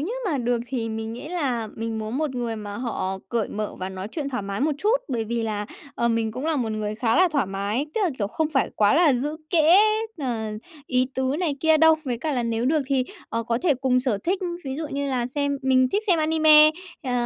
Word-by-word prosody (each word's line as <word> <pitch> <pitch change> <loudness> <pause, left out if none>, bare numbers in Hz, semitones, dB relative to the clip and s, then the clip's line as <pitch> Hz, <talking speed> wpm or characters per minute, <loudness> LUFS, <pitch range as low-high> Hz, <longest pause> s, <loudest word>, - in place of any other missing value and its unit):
như 350 +11 -3 0.2
mà 285 - 0
được 240 -1 0
thì 240 -3 -3
mình 220 0 -4
nghĩ 265 +6 -7
là 260 -10 -1
mình 225 0 -3
muốn 220 +5 -3
một 300 -4 -1
người 235 -2 -2
mà 205 -1 -6
họ 195 -6 -3
cởi 230 -3 -1
mở 215 0 -4
và 185 - -3
nói 190 +1 -6
chuyện 290 -4 -3
thoải 250 -6 -3
mái 200 +4 -4
một 305 +2 +2
chút, 435 +4 +3
bởi 235 -4 -1
vì 235 +1 -2
là, 210 -2 -2 0.3
ờ, 235 - +1
mình 225 -1 0
cũng 255 +5 -5
là 320 -2 +1
một 225 -4 -1
người 215 -1 -3
khá 225 +3 +1
là 365 0 +5
thoải 285 - 0
mái, 200 +8 -2
tức 445 - 0
là, 345 - +1
kiểu, 200 - 0
không 305 +9 -1
phải 270 - +1
quá 205 +4 +4
là 315 -3 +5
giữ 290 +5 -2
kẽ, 340 +3 +6 0.4
ờ, 230 -6 -2 0.4
ý 255 0 +2
tứ 265 +2 0
này 320 -6 -1
kia 320 -1 +5
đâu. 320 +1 +6
Với 245 -3 -2
cả 310 +2 -2
là 245 -3 0
nếu 230 0 -1
được 300 +3 +2
thì, 265 -2 +1 0.2
ờ, 230 0 -2
có 230 +1 -1
thể 310 -6 +3
cùng 255 -1 +1
sở 250 -6 0
thích, 370 +3 +1 0.3
ví 265 -1 -4
dụ 315 0 -3
như 280 0 -2
là 250 -3 0
xem 285 -1 0
mình 260 -1 +3
thích 410 - +1
xem 350 -4 +3
anime, 310 -1 +6 0.3
ờ, 255 -4 -3
255 Hz, 250 wpm, -24 LUFS, 225-300 Hz, 0.4 s, kẽ